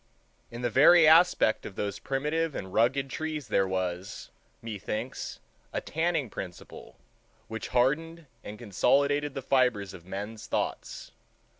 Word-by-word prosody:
In 120 +1 -8
the 120 - 0
very 155 +7 +7
aspect 160 -8 +5
of 95 - -8
those 100 0 -3
primitive 150 +3 -1
and 95 0 -6
rugged 135 +4 +2
trees 155 -2 -4
there 95 -1 +2
was, 95 0 -4 0.3
methinks, 110 +2 -5 0.3
a - - -2
tanning 160 -3 -1
principle 90 -4 -9 0.5
which 110 -1 -5
hardened 155 +7 0 0.2
and 105 - -8
consolidated 140 +7 +1
the 135 - -4
fibers 125 -8 +1
of 85 -1 -12
men's 105 +3 -6
thoughts. - - -3
125 Hz, 130 wpm, -28 LUFS, 105-150 Hz, 0.5 s, very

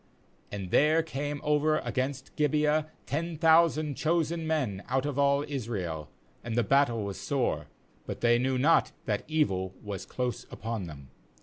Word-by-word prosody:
MAnd 95 -3 -5
there 155 +3 +4
came 145 -1 -4
over 150 +1 +2
against 130 -2 -3
Gibeah 150 +1 +2 0.2
ten 165 +3 -2
thou 165 +1 +6
sand 155 -3 -3
chosen 165 +1 0
men 130 -12 -1
out 130 +2 +1
of 145 -1 -2
all 140 +1 +3
Israel, 100 - -4 0.3
and 115 -1 -3
the 120 - +3
battle 120 -3 +3
was 100 -3 -5
sore; - - -1 0.4
but - - -5
they 120 0 +4
knew 130 +1 +1
not 150 +6 +3
that 105 -2 -1
evil 95 -13 0
was 100 -2 -6
close 125 -1 -3
upon 110 -2 -4
them. 70 -4 -11
140 Hz, 160 wpm, -29 LUFS, 110-155 Hz, 0.4 s, thou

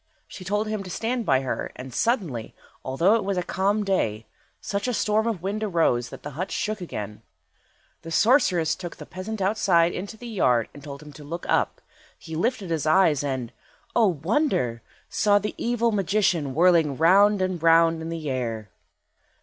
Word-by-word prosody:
She 185 - -10
told 205 +3 -1
him 215 -1 -2
to 190 - -8
stand 230 +4 -2
by 130 -1 +3
her, 130 - -3
and, 130 0 -9
suddenly, 170 - -1 0.3
although 165 +10 +2
it 230 - +2
was 195 -1 -2
a 180 - 0
calm 200 +4 0
day, 115 - -1 0.3
such 200 +3 -3
a 250 - 0
storm 215 +1 +1
of 205 -7 -2
wind 205 +3 -2
arose 160 - +1
that - - -11
the 145 - -6
hut 180 +7 -4
shook 210 -1 -3
again. 105 - -6 0.8
The 165 - -9
sorceress 180 - +3
then - - -9
took 175 -2 -6
the - - -10
peasant 195 +2 -5
outside 185 -4 +3
into 200 +4 -6
the 245 - -11
yard 125 - +1
and 145 - -13
told 140 0 -8
him 150 -1 -12
to 150 - -12
look 170 +4 -6
up. - - 0 0.4
He 160 -2 -8
lifted 205 +1 -1
up - - -5
his 160 -2 -1
eyes, 155 -4 +4
and—O 135 - -2
wonder!—saw 185 - 0
the 205 +1 -2
evil 235 -1 +1
magician 190 -8 +1
whirling 165 -5 +4
round 200 +5 +5
and 185 -3 -1
round 165 0 +4
in 160 - -5
the 165 -2 -5
air. 115 -6 -3
180 Hz, 180 wpm, -25 LUFS, 145-210 Hz, 0.8 s, round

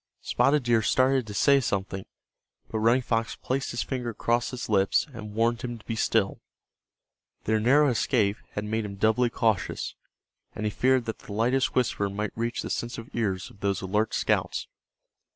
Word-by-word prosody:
Spotted 145 0 +2
Deer 120 -2 +3
started 130 +2 +2
to 105 - -6
say 140 +6 +5
something, 95 -5 -2 0.6
but 110 - -1
Running 120 +4 +3
Fox 115 -1 -1
placed 135 +1 -2
his 120 - -2
finger 125 -3 -3
across 120 +1 0
his 125 - -5
lips 100 -2 +3
and 105 -3 -8
warned 115 +1 +1
him 120 -2 -4
to 110 - -18
be 115 - -3
still. 110 -2 +1 1.0
Their 110 0 +1
narrow 140 +6 +5
escape 110 -3 +1 0.2
had 105 - -3
made 110 +1 -1
him 100 -1 -6
doubly 110 +4 +2
cautious, 110 -5 0 0.6
and 110 - -3
he 105 - 0
feared 130 +3 +2
that 110 - -4
the 100 - -9
lightest 125 +5 +1
whisper 115 -5 +1
might 105 +2 -4
reach 115 +1 -2
the - - -4
sensitive 120 -1 -4
ears 95 -6 -2
of 100 - -19
those 100 -2 -1
alert 105 +3 0
scouts. - - 0
115 Hz, 175 wpm, -27 LUFS, 105-125 Hz, 1.0 s, say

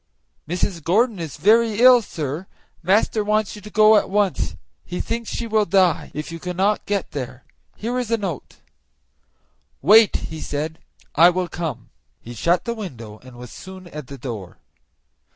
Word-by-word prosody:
"Mrs. 175 -1 -2
Gordon 215 - +2
is 160 -4 -6
very 220 +1 +3
ill, 250 0 +8
sir; 160 -2 -5 0.3
master 210 +4 +2
wants 215 0 0
you 210 - -11
to 210 - -10
go 215 +1 +6
at - - 0
once; 200 -2 0 0.3
he 180 - -6
thinks 230 -1 -3
she 235 - -3
will 220 -2 +2
die 185 -3 +2
if 150 +2 -5
you 165 - -7
cannot 185 +4 -1
get 200 -2 -2
there. 130 -2 -6 0.3
Here 240 +3 -3
is 245 -3 -3
a 230 - +2
note." 185 - -5 1.2
"Wait," 220 +1 +6
he 160 -1 -4
said, 155 +2 -4 0.3
"I 170 +3 +7
will 180 0 -1
come." 155 -9 -5 0.3
He 120 - -10
shut 170 +9 +1
the 235 - -1
window, 115 - -8
and 130 -1 -15
was 125 -1 -10
soon 185 0 -11
at 150 -5 -8
the 140 - -9
door. 110 -8 -7
185 Hz, 170 wpm, -22 LUFS, 150-215 Hz, 1.2 s, ill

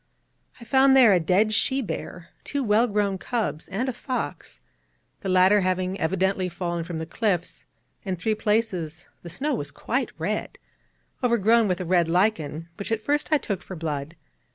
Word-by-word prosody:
I - - -11
found 265 +2 +5
there 235 -6 +7
a 180 - +4
dead 195 +6 +2
she 265 +5 +1
bear, 180 -7 -6
two 285 -1 -2
well 220 +2 +3
grown 200 -3 0
cubs, 205 - -3
and 215 +7 -2
a 260 - -1
fox, 255 +1 -5 0.6
the 195 - -4
latter 185 +3 +5
having 185 +1 -1
evidently 190 +2 0
fallen 170 -1 -3
from 170 0 -5
the 160 - -4
cliffs; 180 -1 -2 0.4
in 190 -2 -2
three 200 +5 0
places 195 -7 -1
the 170 - -9
snow 280 - -2
was - - -3
quite - - -2
red, - - -3 0.7
overgrown 230 -1 +4
with 180 -2 0
a 185 - -3
red 170 -1 +2
lichen, 165 -4 0
which 200 +2 -6
at 225 -1 -1
first 295 +5 0
I 305 - +6
took 200 -9 -4
for 190 - -8
blood. 155 -1 -4
195 Hz, 175 wpm, -25 LUFS, 175-225 Hz, 0.7 s, there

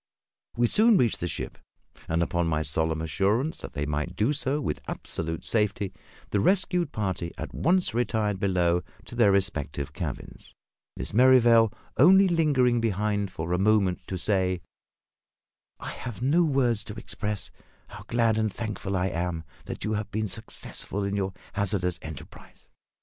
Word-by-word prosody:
We 120 - +4
soon 215 - +5
reached 120 - +2
the 90 - -2
ship, - - -5 0.5
and, 80 +1 +1
upon 85 0 0
my 80 -1 0
solemn 80 +1 0
assurance 105 - 0
that - - -8
they 75 -2 -2
might 75 0 -2
do 115 +8 +2
so 145 -1 -1
with 105 - -3
absolute 80 0 -4
safety, 105 -3 0 0.4
the 105 - +2
rescued 180 - +2
party 95 -5 -2
at - - -6
once 180 -1 +1
retired 105 -4 0
below 90 -3 +2 0.2
to - - -8
their 115 -4 +4
respective 75 -7 -1
cabins; - - -7 0.4
Miss - - -4
Merrivale 120 -2 +6 0.3
only 190 +7 +7
lingering 140 -8 +3
behind 105 -2 0
for 85 +2 -4
a 90 - +1
moment 100 -3 +2
to 95 - -3
say 95 -2 +1 1.2
"I - - -5
have 120 -4 -7
no 150 +8 +3
words 125 -7 +1
to 105 - -7
express 105 -3 -4 0.4
how - - -10
glad 115 -2 +2
and 110 -1 +1
thankful 100 -3 -3
I 90 +1 +1
am 85 -1 -2 0.2
that - - -6
you 110 - -1
have 105 -1 -2
been 110 +1 -2
successful 105 -1 -3
in 100 0 -1
your 95 -1 -1 0.2
hazardous 95 -4 0
enterprise. 80 -3 -11
105 Hz, 155 wpm, -27 LUFS, 90-120 Hz, 1.2 s, only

